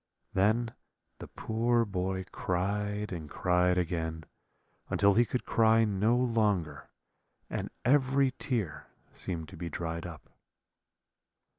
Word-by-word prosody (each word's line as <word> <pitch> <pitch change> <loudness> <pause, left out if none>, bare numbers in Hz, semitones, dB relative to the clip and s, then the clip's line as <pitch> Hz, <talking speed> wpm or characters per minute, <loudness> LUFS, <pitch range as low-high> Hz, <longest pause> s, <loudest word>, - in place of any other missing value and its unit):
Then 110 +4 +2 0.5
the - - -8
poor 115 +1 +1
boy 95 -1 -2
cried 105 +3 -1
and 80 -4 -6
cried 90 +3 +2
again, 80 -2 -2 0.7
until 100 0 +4
he 120 +4 +4
could 125 - -3
cry 115 0 +4
no 105 +3 +2
longer, 105 - 0 0.6
and - - -3 0.2
every 135 0 +4
tear 110 - -2 0.2
seemed 80 -4 -5
to - - -11
be 85 +1 -4
dried 85 +1 -4
up. 80 -4 -11
100 Hz, 115 wpm, -30 LUFS, 90-115 Hz, 0.7 s, until